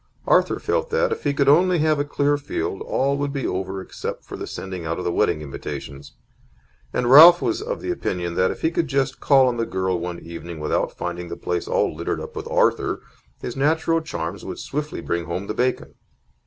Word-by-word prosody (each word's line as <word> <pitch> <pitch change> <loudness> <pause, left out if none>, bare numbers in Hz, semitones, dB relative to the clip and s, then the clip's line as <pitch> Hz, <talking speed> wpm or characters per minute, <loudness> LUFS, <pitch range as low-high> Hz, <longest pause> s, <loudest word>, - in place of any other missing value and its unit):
Arthur - - +3
felt 485 0 -1
that, 485 +1 +1
if 450 - -4
he - - +3
could 140 -1 +2
only 175 +5 +5
have 155 -1 +2
a - - +2
clear 145 0 +1
field, 145 -8 -3
all 140 +1 0
would 145 0 -1
be 140 -2 -3
over 95 +1 -3
except - - -6
the - - -6
sending 95 -2 -6
out 80 +1 -2
of 90 - -4
the 85 - +1
wedding 75 -2 +1
invitations; 70 0 -7 0.8
and 120 - -1
Ralph 170 +5 +10
was 350 - -1
of - - -4
the 360 - -2
opinion 90 - -2
that, 90 +2 +2
if - - -6
he 160 - +2
could 165 -1 0
just 135 -2 0
call 135 -2 +5
on 120 -1 0
the 115 - 0
girl 95 -1 -1
one 85 0 -4
evening 85 0 -8
without 75 - -1
finding 85 0 -4
the 85 - -6
place 90 -1 -3
all - - +1
littered 85 +2 -2
up - - -8
with - - -5
Arthur, - - +1 0.4
his 120 - -5
natural 160 +4 +2
charms 95 - -5
would - - -6
swiftly 150 +1 -4
bring 85 0 -2
home 85 +4 -4
the 105 - -3
bacon. 125 +3 -1
130 Hz, 210 wpm, -23 LUFS, -, 0.8 s, Ralph